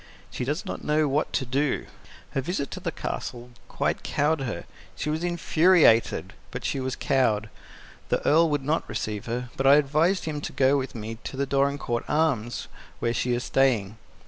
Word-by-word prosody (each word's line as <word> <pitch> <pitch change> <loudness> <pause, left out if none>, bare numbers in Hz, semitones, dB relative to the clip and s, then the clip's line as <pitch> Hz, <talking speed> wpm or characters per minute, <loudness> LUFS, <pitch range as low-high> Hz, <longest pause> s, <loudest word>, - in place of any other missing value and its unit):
She - - -3
does 150 - -2
not - - -5
know 150 0 +2
what 145 +2 0
to 135 - 0
do. 135 +3 0 0.5
Her 135 - -1
visit 140 -1 -3
to - - -5
the - - -3
Castle 120 0 -5 0.2
quite - - -1
cowed 150 +1 +1
her. 110 -10 -3 0.3
She 150 - -2
was 160 +2 -2
infuriated, 170 -7 +3 0.2
but - - -6
she 135 - -1
was 130 0 -2
cowed. 110 -7 +1 0.6
The - - 0
Earl 165 +2 +5
would 145 -2 0
not 155 +4 -1
receive 110 -1 -3
her, 120 +1 -3
but 135 - +1
I 140 - +9
advised 155 +6 +2
him 150 -2 -3
to - - -5
go 135 +1 +4
with 135 -2 -2
me 110 0 -6
to 135 - -5
the 140 - +1
Dorincourt 140 -3 0
Arms, 140 -7 0 0.3
where 115 - 0
she 125 +1 0
is 120 +1 -1
staying. 115 -7 +1
135 Hz, 185 wpm, -26 LUFS, 120-150 Hz, 0.6 s, I